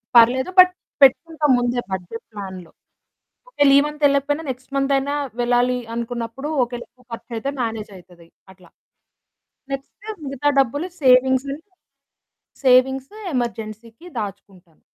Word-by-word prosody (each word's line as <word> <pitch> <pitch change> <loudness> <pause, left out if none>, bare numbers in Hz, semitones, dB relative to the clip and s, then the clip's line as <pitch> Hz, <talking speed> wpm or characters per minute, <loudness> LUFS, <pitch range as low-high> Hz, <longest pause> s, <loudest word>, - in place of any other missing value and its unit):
పర్లేదు, 255 +8 +5
బట్ 365 0 +9 0.3
పెట్టుకుంటా 310 +3 +4
ముందే 245 0 0
బడ్జెట్ 190 +5 -5
ప్లాన్‌లో. 190 -4 -8 0.8
ఒకేళ 285 - +3
ఈ - - +8
మంతెళ్ళకపోయినా 290 +1 +1
నెక్స్ట్ 260 +2 -7
మంతయినా 275 +1 +1 0.3
వెళ్ళాలి 245 +1 +2 0.2
అనుకున్నప్పుడూ, 235 +4 -4
ఒకేళ 245 0 -5
ఎక్కువ 250 0 -27
ఖర్చయితే 230 +2 -5
మేనేజయితది 195 -7 -7 0.3
అట్లా. 180 -2 -21 1.0
నెక్స్టు 415 +10 -7
మిగతా 275 +1 -1
డబ్బులు 285 +7 -1
సేవింగ్స్ 260 0 +4
నుండి, 300 +4 -7 1.0
సేవింగ్సు 265 +6 +3 0.2
ఎమర్జెన్సీకి 230 - -5
దాచుకుంటాను. 195 -4 -9
250 Hz, 105 wpm, -21 LUFS, 225-275 Hz, 1.0 s, బట్